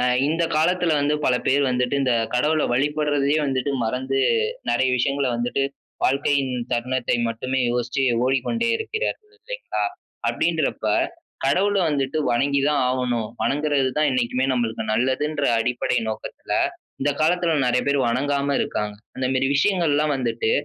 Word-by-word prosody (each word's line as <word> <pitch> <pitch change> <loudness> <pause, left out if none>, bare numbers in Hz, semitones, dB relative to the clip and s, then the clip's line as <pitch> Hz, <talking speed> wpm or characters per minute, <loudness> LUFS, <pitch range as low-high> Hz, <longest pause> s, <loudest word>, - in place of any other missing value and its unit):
ஆ - - +1 0.2
இந்த 165 +3 0
காலத்துல 175 +1 +2
வந்து 145 +1 +1
பல 125 - +3
பேர் 140 +2 +3
வந்துட்டு, 125 +1 0
இந்த 130 -2 +2 0.2
கடவுள 150 +5 +2
வழிபடுறதையே 145 +1 +1
வந்துட்டு, 135 +1 -1
மறந்து 130 +4 -1 0.5
நெறைய 130 - +2
விஷயங்கள 140 +2 +1
வந்துட்டு, 120 +3 -1 0.4
வாழ்க்கையின் 140 -1 +1 0.2
தருணத்தை 125 +1 0
மட்டுமே 130 +3 -2
யோசிச்சு 125 +2 -1 0.2
ஓடிக்கொண்டே 185 - 0
இருக்கிறார்கள் 440 -1 -4
இல்லைங்களா? - - -5 0.5
அப்டின்றப்ப, 160 -9 0 0.6
கடவுள 200 +8 +2
வந்துட்டு 145 0 -1
வணங்கி 140 +3 +2
தான் 150 - +1
ஆவணும். 125 -3 -1
வணங்குறது 145 -2 +1
தான் 155 -1 +3
என்னைக்குமே 125 +1 0
நம்மளுக்கு 115 -3 -1
நல்லதுன்ற 140 +5 0 0.2
அடிப்படை 125 +1 0
நோக்கத்துல 110 - -6 0.5
இந்த 145 +2 +2
காலத்துல 170 +1 +2
நெறைய 125 - +2
பேர் 140 0 +2
வணங்காம 140 +3 0
இருக்காங்க. 105 0 -2 0.2
அந்தமேரி 130 0 0
விஷயங்கள்லாம் 155 -5 +2
வந்துட்டு, 115 -3 -1
140 Hz, 130 wpm, -23 LUFS, 125-150 Hz, 0.6 s, பல